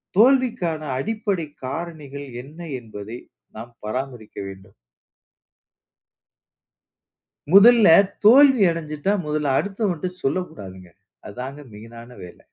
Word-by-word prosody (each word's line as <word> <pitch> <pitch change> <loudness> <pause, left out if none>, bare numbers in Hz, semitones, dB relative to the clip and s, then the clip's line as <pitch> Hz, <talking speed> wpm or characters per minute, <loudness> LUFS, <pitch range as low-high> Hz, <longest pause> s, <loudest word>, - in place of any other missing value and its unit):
தோல்விக்கான 230 - +2 0.2
அடிப்படை 205 - -2 0.2
காரணிகள் 145 -2 -7 0.2
என்ன 150 +5 -15 0.2
என்பதை 110 0 -9 0.4
நாம் 115 +2 -9
பராமரிக்க 120 -1 -6
வேண்டும். 95 -1 -12 2.8
முதல்ல 220 +3 +7 0.4
தோல்வி 265 +1 +7
அடஞ்சுட்டா, 155 +3 -3
முதல்ல 150 -2 -1
அடுத்தவன்ட 195 -4 -2
சொல்லக்கூடாதுங்க. 100 - -5 0.4
அதாங்க 130 +6 -8
மெயினான 115 +3 -12
வேல. 90 - -13
150 Hz, 80 wpm, -22 LUFS, 120-200 Hz, 2.8 s, முதல்ல